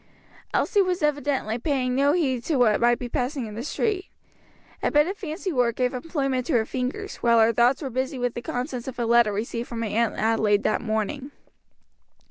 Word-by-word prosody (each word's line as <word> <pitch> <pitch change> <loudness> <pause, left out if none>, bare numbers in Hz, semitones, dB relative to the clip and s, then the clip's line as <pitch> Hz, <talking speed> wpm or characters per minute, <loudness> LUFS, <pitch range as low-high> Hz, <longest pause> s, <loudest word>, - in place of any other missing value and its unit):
Elsie 410 - +2
was 365 -3 -1
evidently 285 -6 0
paying 255 -2 0
no 280 +3 +3
heed 265 -8 0
to 315 - -1
what 235 -5 +3
might 240 0 +4
be 245 - -5
passing 250 +2 -2
in 215 - -8
the 225 - -5
street. 385 - -1 0.7
A - - +1
bit 295 0 +4
of 380 +4 -3
fancy 365 -2 -4
work 245 -3 +1
gave 250 0 0
employment 270 -3 -2
to 320 - 0
her 225 -3 +3
fingers, 260 - -4
while 235 -1 +3
her 225 +1 +4
thoughts 245 +6 +3
were 270 - -4
busy 260 +3 -2
with 245 -1 -1
the 240 - -5
contents 250 0 -4
of 260 - -6
a 240 - -1
letter 235 -2 +4
received 230 +3 -3
from 230 -1 -4
her - - -1
Aunt 230 +2 +1
Adelaide 215 -2 +2
that - - +1
morning. 220 +5 -2
250 Hz, 205 wpm, -25 LUFS, 235-290 Hz, 0.7 s, might